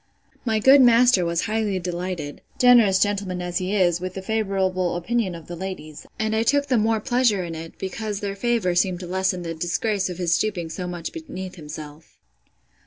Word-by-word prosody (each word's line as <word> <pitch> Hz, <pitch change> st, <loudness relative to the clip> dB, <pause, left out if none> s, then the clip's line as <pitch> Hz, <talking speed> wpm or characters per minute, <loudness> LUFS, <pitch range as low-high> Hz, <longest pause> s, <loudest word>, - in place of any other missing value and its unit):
My 220 Hz, -2 st, +1 dB
good 265 Hz, +6 st, +7 dB
master 240 Hz, -5 st, +5 dB
was 170 Hz, 0 st, 0 dB
highly 215 Hz, -3 st, -1 dB
delighted, 180 Hz, -4 st, -4 dB, 0.2 s
generous 235 Hz, -6 st, +6 dB
gentleman 200 Hz, -2 st, 0 dB
as 180 Hz, 0 st, -2 dB
he 185 Hz, +2 st, -2 dB
is! 175 Hz, -3 st, +2 dB
with 185 Hz, 0 st, -5 dB
the 190 Hz, -, -5 dB
favourable 190 Hz, -4 st, 0 dB
opinion 190 Hz, +1 st, -1 dB
of 165 Hz, -2 st, -10 dB
the 175 Hz, -, -7 dB
ladies; 170 Hz, -4 st, -7 dB
and 220 Hz, 0 st, -1 dB
I 220 Hz, -, +2 dB
took 285 Hz, +4 st, +2 dB
the 260 Hz, -3 st, +1 dB
more 220 Hz, +1 st, +2 dB
pleasure 240 Hz, -4 st, +1 dB
in 170 Hz, -1 st, -5 dB
it, 165 Hz, 0 st, -8 dB
because 205 Hz, +2 st, -4 dB
their 200 Hz, -1 st, -4 dB
favour 225 Hz, -4 st, 0 dB
seemed 175 Hz, 0 st, +1 dB
to -, -, -6 dB
lessen 185 Hz, 0 st, -1 dB
the 165 Hz, -1 st, -4 dB
disgrace 185 Hz, +5 st, -1 dB
of 180 Hz, -, -6 dB
his 175 Hz, -2 st, +1 dB
stooping 175 Hz, -3 st, -1 dB
so 180 Hz, +3 st, -5 dB
much 175 Hz, -2 st, -5 dB
beneath 270 Hz, -, -7 dB
himself. 150 Hz, -1 st, -10 dB
190 Hz, 190 wpm, -23 LUFS, 175-220 Hz, 0.2 s, good